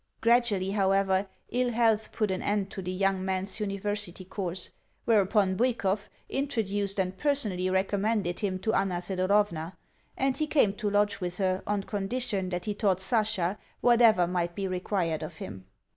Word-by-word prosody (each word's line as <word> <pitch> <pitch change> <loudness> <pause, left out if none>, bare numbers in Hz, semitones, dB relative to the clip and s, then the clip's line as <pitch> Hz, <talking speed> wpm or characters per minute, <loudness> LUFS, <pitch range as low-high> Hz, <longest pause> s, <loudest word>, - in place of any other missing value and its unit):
Gradually, 225 -5 +3
however, 195 -1 +2 0.2
ill 250 0 +1
health 225 -2 +2
put 210 -3 0
an 185 - -2
end 200 -1 -1
to 195 - -5
the 180 0 -4
young 190 0 +1
man's 190 +2 -2
university 205 -2 -3
course; 185 -1 -5 0.3
whereupon 200 -3 +3
Bwikov 210 -3 0 0.2
introduced 205 -7 -1
and 185 0 0
personally 210 -10 0
recommended 195 0 0
him 195 -3 -1
to 220 - 0
Anna 190 -4 +1
Thedorovna, 185 -2 0 0.4
and 270 0 +1
he 310 - 0
came 275 -10 +3
to 210 0 -2
lodge 205 0 +1
with 180 0 -3
her 185 -1 +1
on 205 -1 0
condition 205 -1 -2
that 180 -1 -3
he 210 - -1
taught 200 -3 +1
Sasha 205 -2 0 0.2
whatever 230 -6 +5
might 175 -1 -1
be 195 -1 -2
required 180 -3 -1
of 160 +1 -6
him. 95 -7 -8
195 Hz, 160 wpm, -28 LUFS, 185-215 Hz, 0.4 s, whatever